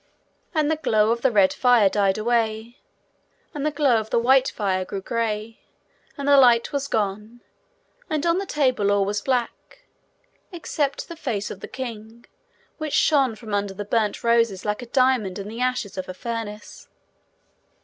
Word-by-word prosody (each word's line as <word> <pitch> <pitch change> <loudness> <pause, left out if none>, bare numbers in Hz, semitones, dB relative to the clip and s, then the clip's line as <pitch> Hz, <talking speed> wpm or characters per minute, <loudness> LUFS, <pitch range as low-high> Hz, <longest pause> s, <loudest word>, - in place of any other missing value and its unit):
And 305 -1 +2
the 315 - 0
glow 220 -7 +2
of 235 0 -1
the 265 - +3
red 200 -4 +4
fire 245 -5 +4
died 195 0 +1
away, 225 +1 -1 0.7
and 290 - -4
the 305 - +2
glow 285 -5 +2
of 220 0 -7
the - - +1
white 260 +3 +4
fire 190 -3 -1
grew 195 +1 -5
grey, 220 +1 -3 0.6
and 280 0 -4
the 285 0 +6
light 240 -1 +4
was 280 -1 -1
gone, 215 +1 -3 0.7
and 305 -1 -1
on 340 +2 +2
the 395 - -5
table 255 -10 +1
all 200 -1 +2
was 205 +1 -2
black 255 - -3 0.7
except 295 -5 -3
the 335 - -8
face 235 -10 -3
of 195 - -8
the - - -8
king, 235 -3 -8 0.5
which 310 -2 -4
shone 270 -7 +3
from 215 -1 -9
under 200 -1 -1
the 205 +1 -5
burnt 215 0 -1
roses 230 -5 +2
like 210 +3 -2
a 245 - -8
diamond 250 -7 +1
in 200 0 -6
the 225 +3 -7
ashes 250 -7 -2
of 185 - -6
a 185 - -6
furnace. 225 -2 -7
230 Hz, 175 wpm, -23 LUFS, 210-265 Hz, 0.7 s, the